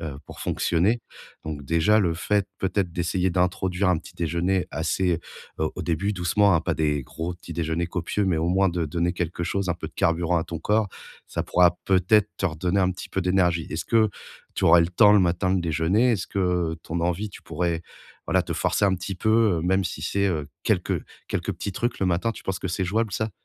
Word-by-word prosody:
heu, 75 -4 -5
pour - - -11
fonctionner. 95 +8 +1 0.4
Donc 75 -2 -5
déjà, 85 +8 +3
le 85 -5 +1
fait 100 +3 0
peut-être 95 -2 -1
d'essayer 90 +1 0
d'introduire 90 +1 0
un 90 -3 +3
petit-déjeuner 85 +4 -1
assez 85 +1 0 0.4
au 80 0 -1
au - - -5
début, 95 +5 -1
doucement, 95 +2 +3
hein. 80 - +3
Pas - - -1
des 75 -2 0
gros 80 +7 -5
petits 85 -1 -10
déjeuners 85 +1 -1
copieux, 95 +4 -1
mais 90 -4 +1
au 80 +2 0
moins 95 +1 +3
de 85 -1 -1
donner 85 +3 -1
quelque 85 -1 -3
chose, 100 +2 -1
un 90 - +1
peu - - -7
de - - -24
carburant 85 +1 +1
à 80 - -2
ton 85 -1 -6
corps. 105 +2 +1 0.4
Ça - - -3
pourra 90 -1 +3
peut-être 95 +3 +3
te 95 - 0
redonner 90 +3 -1
un 95 0 +2
petit 90 - -9
peu 95 - -2
d'énergie. 90 -3 +1
Est-ce 80 - -3
que 110 -2 +3 0.5
tu - - -1
aurais 85 +1 +7
le 85 - +2
temps, 105 +3 +6
le 105 - +6
matin 90 +1 +1
de 95 - +1
déjeuner? 85 +10 +2
Est-ce 95 -5 -2
que 90 -4 0
ton 85 +1 -3
envie, 90 +5 -1
tu - - -11
pourrais, 85 -2 -2 0.4
voilà, - - +2
te - - -4
forcer - - +1
un 95 -1 +3
petit 95 +2 -5
peu? 110 -1 +3
Heu - - -2
même 95 +2 +2
si 80 - -4
c'est, 100 +4 0
heu, 75 -6 -2 0.2
quelques - - 0 0.3
quelques - - -2
petits - - -5
trucs 120 +5 -2
le 95 - +2
matin, 90 +6 +1
tu - - -11
penses 95 -1 -3
que 95 - -4
c'est 90 +2 -1
jouable 105 +2 0
ça? 110 +2 -1
90 Hz, 220 wpm, -25 LUFS, 85-95 Hz, 0.5 s, aurais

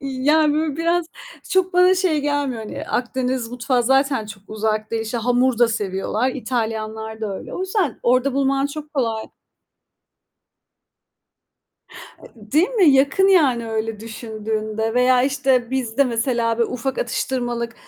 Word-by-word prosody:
İ 275 - -6 0.2
yani 305 0 +4
böyle 305 -2 -1
biraz, 335 +1 +1 0.4
çok 375 -1 +2
bana 360 +1 +5
şey 355 -5 +1
gelmiyor 285 -5 -1
hani 215 - -6
Akdeniz 250 -1 -1
mutfağı 245 0 0
zaten 270 -2 +2
çok 200 -2 -10
uzak 215 0 -2
değil. 225 -1 -1
İşte, 225 +2 -3
hamur 245 +1 +1
da 240 -1 +5
seviyorlar. 210 +2 -1
İtalyanlar 220 -3 -4
da 205 -3 -3
öyle. - - -9
O - - -5
yüzden 375 - -1
orada 255 +2 +2
bulman 275 0 +1
çok 300 +1 -9
kolay. 225 -5 -1 2.9
E 215 -1 -16
değil 320 +6 +4
mi? 405 -11 +4
Yakın 280 +8 +4
yani, 265 -11 +3
öyle 220 -1 -3
düşündüğünde 220 0 -4
veya 250 0 +4
işte 265 -3 +1
bizde 260 0 +1
mesela 235 -1 0
böyle 235 - +1
ufak 255 +2 -3
atıştırmalık 240 - -2
250 Hz, 140 wpm, -21 LUFS, 225-280 Hz, 2.9 s, bana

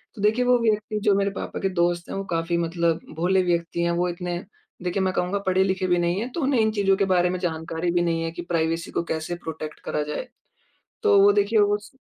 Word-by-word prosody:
तो 210 - -8
देखिए 220 +4 +2
वो 250 0 +5
व्यक्ति 215 -1 0
जो 205 -2 +4
मेरे 200 0 +1
पापा - - -5
के 195 - 0
दोस्त 175 0 0
हैं - - -4
वो 195 - -2
काफ़ी 165 +1 0
मतलब 170 -1 0 0.2
भोले 185 +3 +2
व्यक्ति 170 -1 -1
हैं, 170 - +1
वो 175 +1 0
इतने, 175 0 -4 0.5
देखिए 180 +2 -1
मैं 185 0 0
कहूँगा 180 +3 0
पढ़े-लिखे 190 0 +2
भी 175 -1 +3
नहीं 175 +2 +1
हैं, 245 +4 -4
तो 335 - -4
उन्हें 270 -3 +2
इन 220 0 +2
चीज़ों 200 -2 +2
के 195 - +2
बारे 175 0 +3
में 180 0 -2
जानकारी 165 0 -2
भी 175 0 +2
नहीं 165 -1 0
है 165 - -2
कि 170 - -6
प्राइवेसी 165 -1 -1
को - - -1
कैसे 160 +2 -3
प्रोटेक्ट 155 -1 -6
करा 150 - -1
जाए। - - -4 0.8
तो 200 - +5
वो 205 +1 +7
देखिए 205 +2 +2
वो 205 0 +3
स 210 +4 -16
180 Hz, 240 wpm, -24 LUFS, 170-200 Hz, 0.8 s, वो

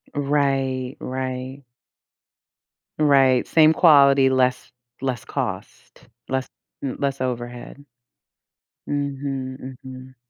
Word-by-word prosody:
Right, 135 -2 0
right. 130 +1 -5 1.4
Right, 135 -4 +4
same 160 -1 +5
quality, 140 -5 +6
less 130 -1 0 0.3
less 130 -2 -3
cost, 115 -9 -6 0.2
less 130 0 -2 0.4
m 135 - -3
less 140 -2 -2
overhead. 120 +2 -5 1.1
Mhm, 135 -2 -4
mhm. 130 0 -11
130 Hz, 80 wpm, -22 LUFS, 130-140 Hz, 1.4 s, quality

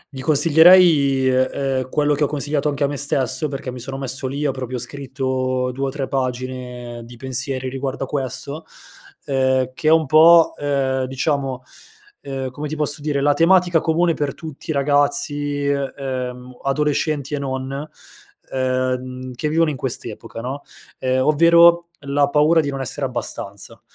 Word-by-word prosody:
Gli 130 - -6
consiglierei 160 +5 +7
i 140 -5 +2
e 130 0 +2 0.3
ehm, 130 0 -5
quello 150 +1 +1
che 150 +1 0
ho - - -1
consigliato 145 0 -1
anche 145 0 -2
a 140 - +3
me 145 0 -4
stesso, 140 +1 0
perché 135 -2 -5
mi 125 - -8
sono 135 +2 -6
messo 135 0 -3
lì, 140 +3 -3
ho 140 - +2
proprio 130 -1 -5
scritto 130 0 -2
2 135 +1 -2
o - - -1
3 135 0 -4
pagine 125 -2 -4
di 120 +1 -13
pensieri 130 +1 -3
riguardo 135 +1 -4
a - - -4
questo, 140 +3 -2 0.6
ehm, 130 -1 +1
che 155 +2 -4
è - - +6
un 160 -1 +4
po', 165 +3 +6
ehm, 135 -2 -1
diciamo, 135 -1 -2 0.6
ehm, 135 -2 -5
come 150 +4 -5
ti 155 - -5
posso 150 -1 -2
dire, 145 -2 -1
la 145 +1 +3
tematica 175 +1 +4
comune 165 +1 +2
per 145 -3 -3
tutti 160 -3 -10
i 155 - +1
ragazzi, 145 0 0
e 140 -1 -1
ehm, 125 -2 -5
adolescenti 150 +1 -1
e 145 - -1
non, 130 -1 -4 0.8
ehm, 130 0 -2
che 150 +5 -3
vivono 160 0 +2
in - - -5
quest'epoca, 125 -2 -5
no, 135 +4 -5 0.4
ehm, 130 0 0
ovvero 170 +2 +5 0.2
la 140 +1 +2
paura 150 +3 +4
di 145 - 0
non 135 -1 -4
essere 135 +2 -1
abbastanza. 100 -5 -5
135 Hz, 170 wpm, -20 LUFS, 130-150 Hz, 0.8 s, consiglierei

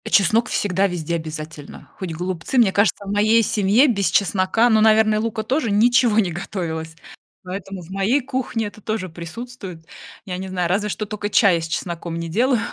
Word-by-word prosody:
А - - -4
чеснок 220 +3 +3
всегда 195 0 +1
везде 170 -3 -4
обязательно, 155 -2 -8
хоть 185 -4 -4
голубцы. 180 +6 -3
Мне 230 -6 +5
кажется, 205 0 +1
в 195 - -4
моей 215 +3 +4
семье 210 +7 +3
без 200 -6 +1
чеснока, 200 +3 +2
ну, 220 -2 +4
наверное, 215 0 +4
лука 220 0 -2
тоже 255 +2 0
ничего 235 +2 +3
не 195 -5 +2
готовилось, 160 -2 -5 0.5
поэтому 190 +1 -6
в 165 - -15
моей 195 +8 +1
кухне 255 -4 -3
это 210 +1 -12
тоже 215 -3 -3
присутствует. 180 +1 -9 0.4
Я 180 -2 -4
не 190 +1 -5
знаю, 180 -2 -1
разве 205 +3 0
что 215 - -3
тока 205 0 -4
чая 195 -5 +4
с 165 - -4
чесноком 170 0 -4
не 170 0 -4
делаю, 240 +7 +2
200 Hz, 185 wpm, -21 LUFS, 175-220 Hz, 0.5 s, Мне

